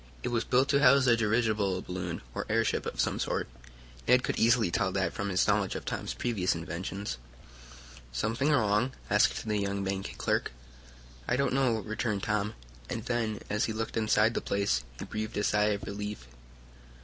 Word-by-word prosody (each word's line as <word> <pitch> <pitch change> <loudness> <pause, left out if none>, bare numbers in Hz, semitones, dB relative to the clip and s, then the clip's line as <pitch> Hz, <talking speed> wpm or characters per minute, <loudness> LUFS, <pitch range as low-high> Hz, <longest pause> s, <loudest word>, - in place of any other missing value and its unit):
It - - -1
was 115 -1 0
built 130 +3 +3
to 140 -1 +4
house 140 -1 +6
a 120 -2 +6
dirigible 110 -4 +1
balloon, 90 -3 -4
or - - -4
airship 115 +1 +1
of - - -6
some - - +1
sort. - - -1 0.6
Ned 125 +1 +5
could - - -1
easily 115 -5 +4
tell 95 +2 +1
that 95 -1 0
from 100 0 -3
his 95 -1 +2
knowledge 100 -2 +1
of - - -5
Tom's - - -3
previous 100 -8 0
inventions. 90 0 -4 0.9
"Something 115 - 0
wrong?" 115 -2 +2 0.2
asked 105 +1 +3
the 105 -1 +1
young 100 0 -1
bank 95 0 -3
clerk. - - 0 0.7
"I - - +2
don't 140 0 +1
know," 125 -5 +2
returned 110 -1 -2
Tom, 105 0 -1 0.3
and 115 0 -4
then 115 -4 -1
as 105 0 +1
he 110 - -2
looked 115 +1 -3
inside 110 0 +3
the - - -1
place, 80 -12 0
he - - -6
breathed 110 +1 -4
a 105 - +1
sigh 105 0 +3
of 105 -1 0
relief. 105 -7 -5
105 Hz, 180 wpm, -30 LUFS, 100-115 Hz, 0.9 s, house